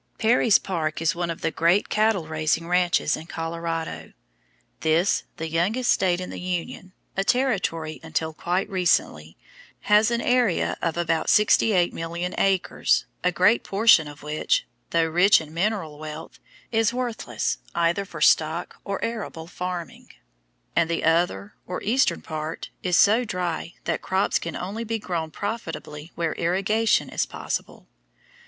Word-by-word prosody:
Perry's 225 -1 +4
Park 160 -5 -3
is 165 +1 +1
one 175 0 -3
of 165 - -5
the 165 - 0
great 170 +6 +2
cattle 215 -6 +1
raising 155 +1 0
ranches 180 0 +2
in 160 - -9
Colorado. 165 0 -4 0.7
This, 165 +4 +2
the 160 - -4
youngest 190 +10 +1
State 180 -2 +2
in 180 - -6
the - - -6
Union, 180 +1 -4 0.2
a 195 - +1
Territory 195 -11 0
until 160 0 -3
quite 180 +4 -1
recently, 170 - 0 0.4
has 210 +2 +4
an 235 0 0
area 245 -6 +2
of 165 -1 -1
about 165 -2 0
68,000,000 180 -4 +2
acres, 195 -2 +2 0.2
a 180 - +3
great 185 +6 +3
portion 200 -6 +4
of 145 0 -11
which, 155 - 0 0.2
though 165 -1 +2
rich 180 +5 +5
in 155 -1 -10
mineral 170 -4 -2
wealth, 155 0 -8 0.3
is 225 -1 +2
worthless 245 -2 -2 0.2
either 170 +3 +1
for 165 -5 -10
stock 160 +3 +2
or 200 +2 -3
arable 220 -8 -5
farming, 180 0 -6 0.7
and 170 -1 +2
the 170 - -1
other 165 - +1
or 180 - -3
eastern 250 +6 +1
part 155 0 -5
is 180 0 +1
so 220 +4 +5
dry 180 -5 -3
that - - -2
crops 190 +1 +1
can 170 - -5
only 200 +6 -4
be 225 0 -2
grown 170 -6 -3
profitably 165 -6 -6
where 165 -2 -1
irrigation 195 +6 +1
is - - -1
possible. - - -5
175 Hz, 145 wpm, -24 LUFS, 165-200 Hz, 0.7 s, rich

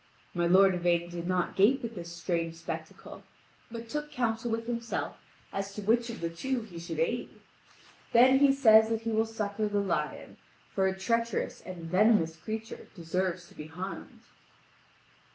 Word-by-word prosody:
My 175 -1 +1
lord 190 +2 +6
Yvain 175 -1 +1
did 170 0 -5
not 180 -1 0
gape 230 +8 +4
at 230 0 -4
this 170 -4 -7
strange 170 -1 -2
spectacle, 165 - -7 0.5
but 230 0 -7
took 295 +5 -4
counsel 235 -1 -1
with 230 0 -2
himself 235 -1 -3 0.4
as 195 0 -4
to 210 - -5
which 235 +3 +2
of 235 - -7
the 170 - -1
two 260 +9 -2
he 180 -6 -10
should 170 - -6
aid. 485 0 0 0.8
Then 255 +3 +6
he 280 -1 +6
says 220 -5 +6
that 225 -1 -1
he 230 0 -2
will 220 +1 +2
succour 215 -1 -2
the 205 0 -1
lion, 200 -1 -2 0.4
for 190 -1 +2
a 190 0 -2
treacherous 230 +2 -1
and 180 -3 -8
venomous 185 -2 +3
creature 220 +6 -6
deserves 180 0 -2
to - - -17
be 150 - -8
harmed. 180 +5 -7
205 Hz, 170 wpm, -30 LUFS, 175-230 Hz, 0.8 s, lord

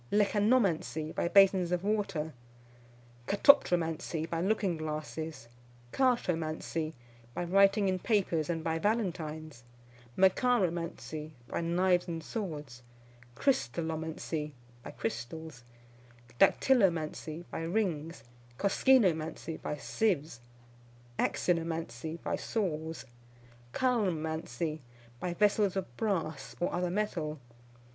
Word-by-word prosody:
Lecanomancy, 205 -7 +2
by - - 0
basins 190 -1 +5
of 180 0 0
water. 195 -7 -1 0.9
Katoptromancy, 170 - +3
by 165 0 -2
looking 195 -2 +1
glasses. 155 -2 -5 0.5
Chartomancy, 165 -10 0 0.4
by - - -1
writing 195 +3 +4
in 185 -1 +1
papers, 180 -8 +1
and 165 -2 -1
by 160 0 0
Valentines. 160 - -2 0.5
Macharomancy, 175 -7 +1
by - - -2
knives 175 +2 +2
and 165 -2 -4
swords. 150 - -5 0.5
Crystallomancy, 160 - -1 0.3
by - - -8
crystals. 125 +4 -5 0.8
Dactylomancy, 170 - +2
by - - -4
rings. 165 - -2 0.3
Koskinomancy, 180 - +2
by 150 - -3
sieves. 155 - -1 0.8
Axinomancy, 165 -3 -1
by - - 0
saws. 160 -7 -3 0.7
Chalcomancy, 160 - -1 0.4
by 175 -1 -3
vessels 205 0 +3
of 170 -11 -4
brass, 170 - -2
or 175 - 0
other 180 0 0
metal. 175 -6 -2
170 Hz, 90 wpm, -31 LUFS, 155-195 Hz, 0.9 s, basins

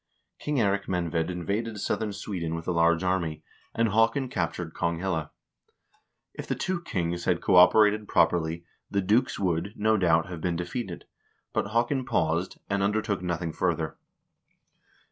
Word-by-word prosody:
King 150 - -2
Eirik 100 -2 +1
Menved 85 -2 -1
invaded 100 +5 -3
southern 105 +1 -1
Sweden 90 -5 -4
with 80 0 -6
a - - +1
large 85 0 +3
army, 85 -4 -1 0.3
and 115 0 +2
Haakon 115 +5 +2
captured 85 -4 -3
Konghelle. 85 -2 -1 1.0
If - - -7
the - - -1
two 185 -2 -2
kings 85 - -2
had 85 -1 +2
cooperated 105 +4 +5
properly, 85 0 +1 0.2
the 100 - 0
dukes 110 +7 +2
would, 90 +1 -1
no 110 +1 +2
doubt, 85 -3 +3
have 85 -3 -7
been 85 0 0
defeated, 90 +8 -5 0.5
but - - 0
Haakon 120 +5 +1
paused, 85 -7 0
and 100 0 0
under 105 +2 +1
took 100 -3 -2
nothing 85 -2 -2
further. - - -1
90 Hz, 145 wpm, -27 LUFS, 85-105 Hz, 1.0 s, cooperated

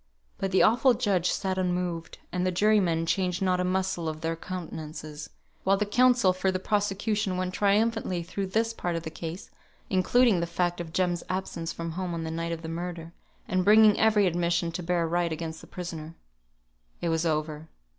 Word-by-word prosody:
But 195 - -1
the 190 - +4
awful 245 +3 +4
judge 185 -5 +1
sat 190 -1 -1
unmoved; 180 -2 -2
and 180 0 -1
the 185 - +1
jurymen 180 -4 +2
changed 180 0 0
not 185 -1 +1
a - - +1
muscle 185 -2 -1
of 155 0 -6
their 165 0 -1
countenances; 155 -4 -7 0.3
while 195 +1 +3
the 210 - 0
counsel 240 -2 +4
for 190 +1 0
the 185 - -1
prosecution 205 0 0
went 185 0 -2
triumphantly 205 -3 +1
through 190 +3 -4
this 225 +4 0
part 175 -6 -3
of 165 - -3
the 160 - -6
case, 165 +3 -7 0.4
including 200 +2 +4
the 170 - -1
fact 175 0 -1
of 165 -2 -7
Jem's 175 -1 0
absence 180 -3 -3
from 165 0 -5
home 180 0 -3
on 165 - -3
the 160 - -4
night 165 +1 -3
of 165 0 -5
the - - -5
murder, 170 0 -5 0.3
and 185 0 +1
bringing 210 +1 +6
every 215 -2 +4
admission 170 -1 +1
to 165 - -4
bear 170 -1 0
right 170 0 0
against 160 0 -5
the - - -13
prisoner. 165 -3 -7 0.8
It 170 - -1
was 165 0 +1
over. 155 -1 -2
180 Hz, 190 wpm, -27 LUFS, 165-195 Hz, 0.8 s, bringing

